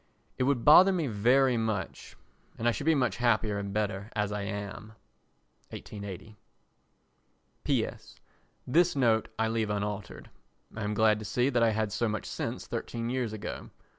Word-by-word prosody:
It 130 - +2
would 135 -4 0
bother 180 +6 +8
me 175 -4 0
very 125 +3 +3
much 110 -5 -3 0.4
and 115 - -1
I - - +5
should 140 - -5
be 160 - +5
much 125 -4 0
happier 110 -4 +1
and 100 0 -5
better 100 0 -2
as 105 -1 0
I 105 0 -3
am. 100 +2 -6 0.8
[1880.] 100 0 -9 1.2
P.S.—This 170 +6 -2
note 115 -5 +2
I 110 - +1
leave 110 -1 -1
unaltered. 105 0 -4 0.4
I 110 - -5
am 105 0 -2
glad 110 0 +3
to 110 - -7
see 125 +5 +1
that 125 -3 +1
I 115 - +5
had 110 -1 -1
so 110 +2 0
much 105 -1 -3
sense - - -4
thirteen 115 0 -4
years 125 -4 -1
ago. 110 -1 -6
110 Hz, 160 wpm, -29 LUFS, 105-125 Hz, 1.2 s, bother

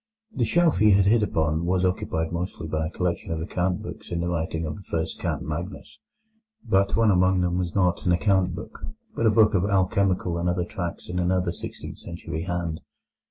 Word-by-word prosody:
The 120 - +1
shelf 170 +7 +3
he 105 -1 +6
had 95 0 +4
hit 110 +3 +4
upon 80 -5 0
was 90 +1 +1
occupied 90 -4 -1
mostly 85 -2 -4
by 80 0 -1
a - - -4
collection 90 -1 -2
of 80 - -1
account 90 +2 -1
books - - -8
in 85 - -1
the 85 - -1
writing 80 -1 -2
of 75 -1 -4
the - - -10
first 80 -4 -3
Count - - -2
Magnus. 75 -1 -6 0.7
But 100 +1 +3
one 115 -2 +4
among 95 0 +3
them 90 0 0
was 90 -2 -3
not 90 -3 +2
an - - +4
account 95 +1 +2
book, - - -9 0.4
but 115 - +2
a - - +7
book 105 0 +5
of 95 -3 +2
alchemical 95 -2 +1
and 90 +1 0
other 90 0 0
tracts 90 -3 -5
in 90 0 -3
another 90 0 +1
sixteenth - - -7
century 85 -2 -5
hand. 85 -3 -2
90 Hz, 205 wpm, -25 LUFS, 85-95 Hz, 0.7 s, a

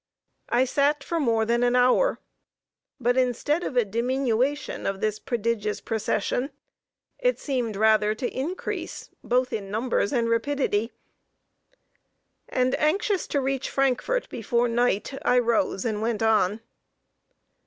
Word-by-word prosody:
I 245 +2 +3
sat 285 +2 +1
for 335 - -2
more 230 -6 +2
than 235 +1 +1
an 245 0 +2
hour, 255 - +3 0.8
but, 245 0 +1
instead 260 +6 +1
of 255 - -3
a 240 - +4
diminution 255 +4 -1
of 195 0 -2
this 215 0 -1
prodigious 225 -3 -2
procession, 225 +3 -1 0.7
it - - +1
seemed 245 -6 -2
rather 215 0 +3
to 245 +2 -2
increase 315 +8 -4
both 250 +1 +1
in 195 -2 -4
numbers 220 0 0
and 235 -3 +1
rapidity, 230 -2 0 1.6
and, 255 0 +1
anxious 385 +5 +1
to 285 - 0
reach 270 0 -2
Frankfort 275 - 0
before 240 -1 0
night, 240 -1 0
I 250 - +3
rose 230 -4 +1
and 215 -2 -1
went 225 -1 -1
on. 215 -1 +2
245 Hz, 130 wpm, -25 LUFS, 220-270 Hz, 1.6 s, a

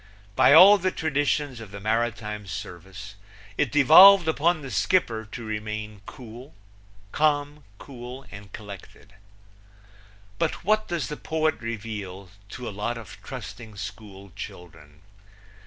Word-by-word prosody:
By - - +5
all 190 +7 +9
the 185 +1 0
traditions 145 -5 -1
of 115 -3 -10
the 100 0 -9
maritime 110 -1 -2
service 95 +3 -8 0.4
it - - 0
devolved 160 +6 +8
upon 160 0 +1
the 135 - -7
skipper 110 - 0
to 120 - -7
remain 105 -1 -5 1.1
calm, 145 -1 0
cool 125 +1 -10
and 100 -1 -11
collected. 100 0 -12 1.3
But - - -2
what 215 +2 +2
does 170 -4 -3
the 150 - -6
poet 155 -5 -1
reveal 105 -5 -6 0.2
to 125 +2 -7
a - - -4
lot 115 +4 -3
of 115 -5 -11
trusting 110 -1 -9
school 100 -1 -9
children? 75 -4 -11
115 Hz, 125 wpm, -25 LUFS, 100-150 Hz, 1.3 s, all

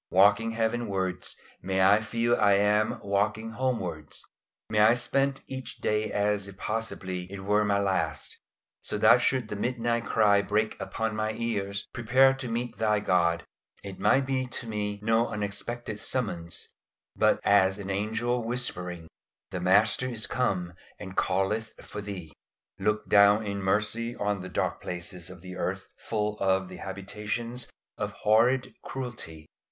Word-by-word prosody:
Walking 105 +4 +4
heavenwards, 110 -5 -1 0.3
may 95 0 +2
I 100 +3 +6
feel 115 +2 +1
I 100 -1 +4
am 105 +2 +2
walking 105 +3 0
homewards. 95 - -3 0.4
May 105 - 0
I 110 +3 +7
spend 135 +3 +1
each 130 -1 -7
day 105 0 0
as 105 -1 0
if 100 -1 -11
possibly 95 -5 -3
it 100 -1 -6
were 105 +2 +2
my 100 -1 +2
last, 100 -1 -1 0.5
so - - -2
that - - +6
should 130 -4 +1
the - - -3
midnight 120 +1 -1
cry 105 -2 +4
break 105 +2 0
upon 110 +3 -2
my 110 0 -1
ears, 100 -3 -2
"Prepare 130 +3 +4
to 135 -1 -5
meet 120 +1 -3
Thy 105 -1 +2
God," 85 -4 +2 0.4
it 100 -2 -8
might 135 0 +3
be 130 -1 -1
to 120 - -4
me 105 -2 -3
no 115 +1 +3
unexpected 105 +1 -4
summons, 85 -9 -3 0.5
but - - +3
as 95 -1 +4
an 100 -1 -5
angel 110 +5 0
whispering, 90 -8 -3 0.4
"The 90 - -3
Master 105 +7 +4
is 115 -3 0
come 90 -9 -1 0.2
and 95 +1 -8
calleth 95 +4 0
for 105 - -7
thee." 95 -6 -7 0.5
Look 105 +2 0
down 100 +1 +6
in 100 -1 -3
mercy 105 +4 0
on 105 -1 -1
the 95 - -7
dark - - -1
places 90 0 -5
of 90 -2 -11
the 90 0 -8
earth - - -3
full 105 -1 -2
of 95 -1 +1
the 90 - -9
habitations 105 +5 -4 0.3
of - - -2
horrid 120 +5 +3
cruelty. 110 -12 -5
105 Hz, 150 wpm, -28 LUFS, 95-115 Hz, 0.5 s, I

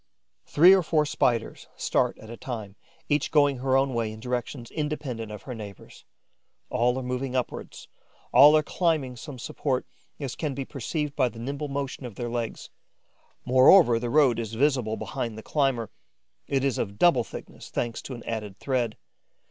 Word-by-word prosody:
Three 175 +6 +7
or 190 - +5
four 155 -2 +1
Spiders 120 -5 0
start - - +1
at 110 +1 -11
a - - -6
time, 110 -5 -6 0.3
each 145 -1 +1
going 145 -3 +3
her 130 0 +2
own 135 0 +1
way 115 -2 -1
in 110 - -9
directions 125 0 -4
independent 140 -8 -4
of 105 -2 -8
her 125 - -6
neighbours'. 105 -4 -10 0.7
All 125 +2 +2
are 130 - -3
moving 125 +1 -3
upwards, 125 - -4 0.5
all 150 +2 +9
are 155 - +2
climbing 155 -6 0
some 135 +3 -9
support, 130 +1 -2 0.3
as 140 -4 -4
can 150 -4 -3
be 135 0 -4
perceived 150 +3 -3
by 130 -3 +2
the 115 - -14
nimble 140 +5 -4
motion 140 -1 -4
of 115 - -11
their 120 +1 -4
legs. 120 -1 -4 0.7
Moreover, 130 0 +6
the 120 0 -3
road 135 -4 +4
is 115 -1 -4
visible 125 -4 +1
behind 115 -2 -4
the 110 - -8
climber, 135 -7 0 0.6
it 135 -1 0
is 135 -3 0
of 100 -1 -3
double 135 -4 +4
thickness, - - -10
thanks 120 -1 -3
to 130 - -7
an 120 - -10
added 105 -4 -5
thread. 125 -5 -1
125 Hz, 175 wpm, -26 LUFS, 115-145 Hz, 0.7 s, all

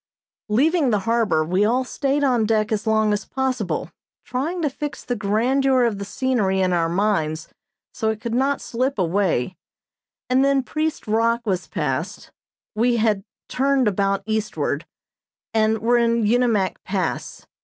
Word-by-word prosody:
Leaving 290 +6 +3
the 210 -3 +1
harbor, 225 -9 +2
we 185 +5 +1
all 245 +5 +2
stayed 280 +2 -1
on 250 -5 +3
deck 215 0 +1
as 215 0 -1
long 220 -1 +3
as 205 - -2
possible 255 -7 -2 0.3
trying 305 +8 -2
to 320 - +1
fix 285 +1 -5
the 245 - -1
grandeur 250 +5 +2
of 225 -4 0
the 200 - -4
scenery 205 -4 0
in 185 -1 +2
our 165 -1 +1
minds 165 -4 0 0.4
so 220 - -1
it 220 -1 -2
could 230 0 -4
not 270 +3 +1
slip 255 +4 -2
away, 185 -4 0 0.7
and 255 +1 +3
then 275 -1 +2
Priest 310 +4 -2
Rock 230 +2 +1
was 185 -4 -1
passed, 155 0 -3 0.4
we 235 +2 +2
had 215 -3 +1 0.2
turned 270 -1 +1
about 195 0 0
eastward, 215 -9 -2 0.7
and 220 0 +2
were 240 +2 +2
in 235 -1 +2
Unimak 225 -4 +1
Pass. 185 -3 -3
220 Hz, 155 wpm, -22 LUFS, 200-255 Hz, 0.7 s, Leaving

